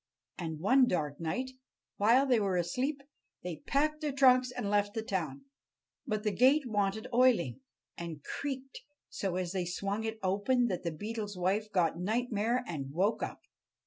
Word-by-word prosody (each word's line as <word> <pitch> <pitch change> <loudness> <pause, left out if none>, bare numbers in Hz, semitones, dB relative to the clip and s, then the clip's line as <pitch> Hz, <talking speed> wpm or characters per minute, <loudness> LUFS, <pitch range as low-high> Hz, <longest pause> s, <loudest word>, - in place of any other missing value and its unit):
And 160 -3 -4
one 255 - +5
dark 150 - -1
night, 250 +11 -2 0.5
while 235 +7 +5
they 250 -4 +3
were 195 -3 +1
asleep, 260 - -1 0.4
they 175 -3 -4
packed 305 +2 +1
their 300 -1 -1
trunks 255 -2 +5
and 245 -3 -4
left 205 0 +1
the 225 - -2
town. 155 -10 -3 0.6
But 215 0 -1
the 210 - +1
gate 260 +9 +4
wanted 205 -2 0
oiling, 230 - +3 0.4
and 165 -4 -6
creaked 270 -2 -5 0.3
so 190 -3 -3
as 180 -2 -2
they 185 -2 -1
swung 200 +4 -2
it 220 0 -3
open 205 +7 +2
that 185 - -2
the 170 - -2
Beetle's 205 +3 -5
wife 200 +4 0
got 170 -3 +1
nightmare 230 +4 0
and 140 - -5
woke 190 +8 +1
up. - - -4
205 Hz, 165 wpm, -31 LUFS, 180-250 Hz, 0.6 s, one